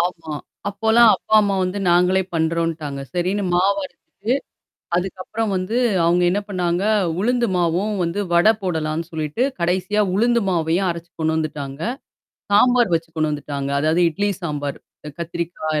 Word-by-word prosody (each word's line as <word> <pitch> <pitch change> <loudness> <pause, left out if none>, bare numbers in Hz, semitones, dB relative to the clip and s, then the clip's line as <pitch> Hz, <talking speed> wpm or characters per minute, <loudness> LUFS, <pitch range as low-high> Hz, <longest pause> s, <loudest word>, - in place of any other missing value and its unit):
ஆமா. 165 -3 -2 0.3
அப்போலாம் 220 +3 +5
அப்பா 220 - -2
அம்மா 200 -2 +1
வந்து 185 +3 -3
நாங்களே 180 +2 +4
பண்றோன்ட்டாங்க. 160 -3 -1
சரின்னு 185 +4 0
மாவு 195 +3 +3
அரைச்சுட்டு. 215 +5 -4 0.6
அதுக்கப்புறம் 195 +4 -3
வந்து, 185 +6 -2 0.3
அவங்க 175 +1 +3
என்ன 200 +3 0
பண்ணாங்க, 180 -1 -1 0.4
உளுந்து 240 +2 +1
மாவும் 180 +5 0
வந்து 170 +4 -1
வடை 175 +6 +6
போடலான்னு 160 -2 -2
சொல்லீட்டு, 155 - -2 0.2
கடைசியா 185 +4 +1
உளுந்து 235 +3 +3
மாவையும் 175 +2 +1
அரைச்சு 170 0 -7
கொண்டு 160 0 +1
வந்துட்டாங்க. 150 -3 -4 0.7
சாம்பார் 240 0 +4
வச்சு 165 0 -2
கொண்டு 155 -1 -1
வந்துட்டாங்க. 140 -1 -4
அதாவது 160 +3 +2
இட்லி 205 +6 -1
சாம்பார். 145 -3 -3 0.3
அ - - -4
கத்திரிக்காய் 165 -2 -3
175 Hz, 135 wpm, -21 LUFS, 160-200 Hz, 0.7 s, வடை